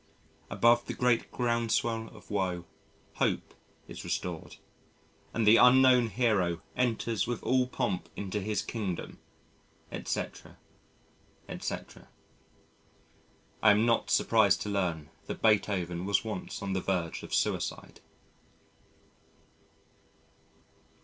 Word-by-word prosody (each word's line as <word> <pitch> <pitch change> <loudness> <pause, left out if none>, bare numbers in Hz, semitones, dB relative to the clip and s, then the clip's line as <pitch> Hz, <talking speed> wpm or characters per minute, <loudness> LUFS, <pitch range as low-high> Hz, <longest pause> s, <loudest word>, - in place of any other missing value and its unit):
Above 120 +1 +3
the - - -4
great 125 -2 +1
groundswell 115 -1 0
of 105 - -15
woe, 90 -4 -1 0.5
Hope - - 0 0.3
is - - -8
restored 85 -3 -4 0.8
and 115 - 0
the 110 +2 +7
Unknown 125 -1 +6
Hero 100 -7 +1 0.2
enters 115 -3 0
with 120 -2 -3
all 130 -1 +2
pomp 90 -7 -2
into 100 +1 -3
his 105 +1 -1
Kingdom, 100 -7 -5 0.7
etc., - - -5 0.9
etc. - - -6 1.5
I 110 - +6
am 105 +2 +5
not 115 -1 +1
surprised 110 -4 +3
to 105 - -4
learn 85 -6 -2 0.2
that - - -5
Beethoven 95 -5 +1
was 100 +3 +1
once 105 -2 -5
on 100 -1 -2
the 95 - -1
verge 90 -4 -2
of - - -10
suicide. - - -2
105 Hz, 105 wpm, -30 LUFS, 95-115 Hz, 1.5 s, the